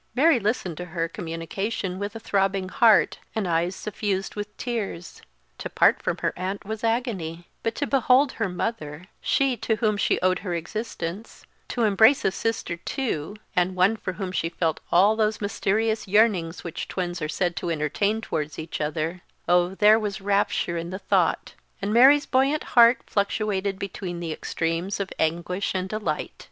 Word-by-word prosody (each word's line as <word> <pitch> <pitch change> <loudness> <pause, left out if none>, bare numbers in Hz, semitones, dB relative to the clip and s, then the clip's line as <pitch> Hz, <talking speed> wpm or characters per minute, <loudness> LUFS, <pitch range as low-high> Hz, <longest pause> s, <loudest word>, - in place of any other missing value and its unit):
Mary 285 0 +5
listened 205 -6 -1
to 180 - -5
her 165 -1 -2
communication 185 +3 -4
with 205 +1 -4
a - - -5
throbbing 195 -2 0
heart 225 +2 +4 0.2
and 215 -4 -1
eyes 170 +2 0
suffused 200 -2 -3
with 210 0 -6
tears; 215 -8 -4 0.4
to - - -5
part - - +3
from - - -1
her - - 0
aunt 190 +3 -4
was 220 +2 -5
agony; 200 -8 -2
but 225 - -2
to 290 - -1
behold 265 0 +3
her 220 -5 -2
mother 180 -4 -4 0.2
she 270 -2 +2
to 220 0 -1
whom 215 -1 +1
she - - +1
owed 185 0 +2
her 180 -2 -3
existence, 190 +2 -5 0.2
to 240 - -1
embrace 220 +6 +5
a - - +3
sister 195 -5 -2
too 190 - -3 0.2
and 180 +1 +1
one 185 +4 +4
for 185 -4 -5
whom 185 0 -4
she 165 -2 -1
felt 165 -2 -1
all 200 +5 +5
those 215 -1 +1
mysterious 215 +2 0
yearnings 190 -5 +2
which 170 - -5
twins 175 -2 -3
are 155 - -2
said 175 +1 -1
to 175 - -3
entertain 170 +8 0
towards 150 -7 -3
each 160 0 -5
other 155 +4 -2 0.3
oh, 180 +1 +3
there 215 +2 +6
was 210 -1 -3
rapture 200 -3 0
in 170 +1 -4
the 185 - -4
thought, 190 - +1 0.3
and 200 +2 -2
Mary's 275 +5 +7
buoyant 270 +4 +2
heart 235 +1 +7
fluctuated 200 -1 -1
between 185 -2 -5
the 170 -2 -4
extremes 165 +6 -2
of 195 -1 -3
anguish 175 +5 -1
and 185 0 -2
delight. 215 +1 -2
195 Hz, 170 wpm, -25 LUFS, 175-220 Hz, 0.4 s, Mary's